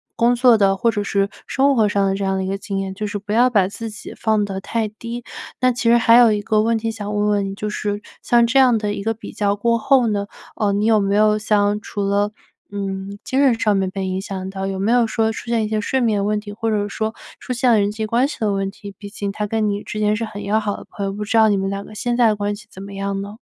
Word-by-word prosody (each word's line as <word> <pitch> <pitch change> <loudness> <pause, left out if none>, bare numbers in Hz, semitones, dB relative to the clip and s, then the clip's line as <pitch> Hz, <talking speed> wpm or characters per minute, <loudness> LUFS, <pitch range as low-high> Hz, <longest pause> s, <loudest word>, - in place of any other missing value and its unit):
工 240 +1 +3
作 245 -1 +5
的， 195 -2 +3
或 230 +4 +2
者 205 -2 -2
是 200 0 +1 0.2
生 275 +1 +2
活 220 -3 +3
上 200 -1 +1
的 195 - +1
这 200 - -3
样 195 0 0
的 190 - -1
一 - - -3
个 195 - -1
经 195 0 -5
验， 195 0 -3
就 210 +2 -4
是 205 0 -3
不 205 +1 -7
要 245 +3 +5
把 200 -6 +3
自 225 +3 -6
己 210 -2 -9
放 215 -2 +1
得 195 -1 -4
太 225 +2 -1
低。 230 +3 -7 0.4
那 255 0 +4
其 235 -1 0
实 235 - +6
还 230 0 +5
有 240 -2 +7
一 210 - +1
个 215 +1 +2
问 230 +1 +1
题 225 +1 -2
想 210 -1 -5
问 210 0 +1
问 205 -1 +1
你， 195 - -6
就 210 - -4
是 205 -1 -2 0.2
像 235 -1 +4
这 245 +4 +3
样 250 -3 +5
的 210 -1 -2
一 200 - -5
个 225 +2 0
比 225 - -9
较 205 -1 0
过 230 +3 +1
后 260 +2 +3
呢， 200 -2 -1 0.3
呃， 210 -2 +1
你 205 +1 0
有 220 -1 +4
没 200 0 +1
有 215 0 +4
像 210 -1 +1
除 205 - -4
了， 200 +1 +1 0.4
嗯， 195 0 -5
精 260 - -1
神 245 -5 +3
上 210 -2 +2
面 190 -1 0
被 190 0 -4
影 185 0 -2
响 190 -1 -5
到， 195 0 -4
有 195 0 -3
没 200 +4 0
有 240 -1 +4
说 220 0 0
出 225 - -8
现 230 -2 +1
一 - - -2
些 215 0 -1
睡 265 +5 0
眠 215 -5 +1
问 210 +1 0
题， 205 -1 -9
或 225 +2 -2
者 205 -2 0
说 220 +2 -3 0.2
出 - - -7
现 245 0 +2
了 220 - +5
人 200 0 +1
际 220 +1 -3
关 235 +5 +2
系 295 - -7
的 215 -3 +1
问 195 0 -1
题？ 200 0 -10
毕 205 - -8
竟 200 -1 -4
他 210 +1 -3
跟 220 0 0
你 205 0 -1
之 210 - -7
间 210 0 +2
是 225 +1 -2
很 205 -2 -8
要 205 +2 +1
好 210 -2 -3
的 - - -11
朋 200 - -5
友， - - -2
不 205 +2 -5
知 220 - -2
道 220 -1 +6
你 205 - +2
们 195 0 -1
两 200 0 -4
个 215 - -13
现 240 +3 -1
在 240 -1 +4
的 215 - +2
关 205 0 -2
系 215 +1 -14
怎 190 - -10
么 200 0 -9
样 195 0 -3
呢？ 205 +1 -8
210 Hz, 320 characters per minute, -20 LUFS, 200-225 Hz, 0.4 s, 有